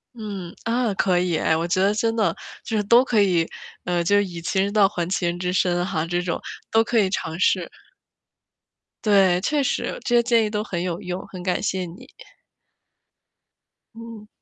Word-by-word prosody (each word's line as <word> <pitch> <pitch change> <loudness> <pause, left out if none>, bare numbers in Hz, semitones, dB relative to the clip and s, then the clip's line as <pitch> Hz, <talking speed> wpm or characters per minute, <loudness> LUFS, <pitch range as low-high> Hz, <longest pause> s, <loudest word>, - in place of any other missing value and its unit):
嗯， 200 -6 -7
啊， 230 -1 0
可 185 -2 +1
以， 175 -3 +1
哎， 160 +1 +1
我 170 +1 -2
觉 185 +2 +1
得 195 +1 +4
真 225 +2 0
的， 205 -7 +1 0.3
就 225 - -2
是 210 - +1
都 235 +5 +6
可 230 -5 +1
以 175 -5 +2 0.3
呃， 175 -1 0
就 200 +4 +2
是 205 - +4
“以 175 -3 -7
其 190 - 0
人 200 +1 0
道 205 -2 +5
还 175 -3 -3
其 185 -1 -1
人 175 0 -1
之 180 0 -1
身” 175 -1 +1
哈， 160 -3 -1
这 175 +1 -1
种， 175 -2 -2 0.3
都 225 0 +4
可 230 0 +1
以 195 - +2
尝 165 -3 -3
试。 185 -2 +2 1.3
对， 195 -4 +4
确 295 +8 +1
实， - - -2
这 240 - +2
些 235 - +5
建 235 -2 +3
议 210 - -2
都 210 0 -2
很 175 -5 -4
有 175 -1 -3
用， 180 +1 -5
很 185 -2 -9
感 180 -1 0
谢 190 -2 -1
你。 170 +2 -12 1.9
嗯。 230 -2 -10
190 Hz, 210 characters per minute, -23 LUFS, 175-215 Hz, 1.9 s, 都